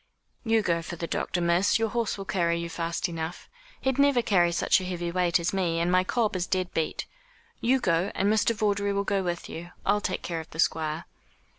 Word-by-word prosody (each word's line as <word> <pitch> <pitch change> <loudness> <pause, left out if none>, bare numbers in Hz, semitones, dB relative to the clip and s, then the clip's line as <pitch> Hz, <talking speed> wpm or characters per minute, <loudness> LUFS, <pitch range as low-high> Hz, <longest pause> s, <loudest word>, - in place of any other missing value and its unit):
"You 225 -2 +2
go 170 -3 +1
for 170 - -6
the 170 - -4
doctor, 175 +1 -2
miss; 175 +5 +3
your 225 0 0
horse 230 -1 -1
will 195 - -6
carry 170 -3 +1
you 170 0 -4
fast 170 +2 -2
enough. 165 0 -5 0.3
He'd 265 0 0
never 280 -4 +4
carry 175 -5 +3
such 175 - +2
a - - -5
heavy 175 -2 -3
weight 180 -1 +2
as 170 +2 -1
me, 175 -4 0
and 170 +1 +1
my 185 0 +4
cob 215 +1 0
is 180 -1 -1
dead 185 -1 -1
beat. 160 -1 -1 0.5
You 260 +3 +3
go, 175 -3 +1
and 195 - +1
Mr. 220 +1 +2
Vawdrey 205 -2 +1
will 200 0 0
go 200 -1 0
with 175 -2 -3
you. 175 +2 -7 0.2
I'll 205 +1 +2
take 185 - -2
care 170 -2 -3
of 160 - -9
the 160 - -11
Squire." 160 0 0
180 Hz, 225 wpm, -27 LUFS, 170-205 Hz, 0.5 s, never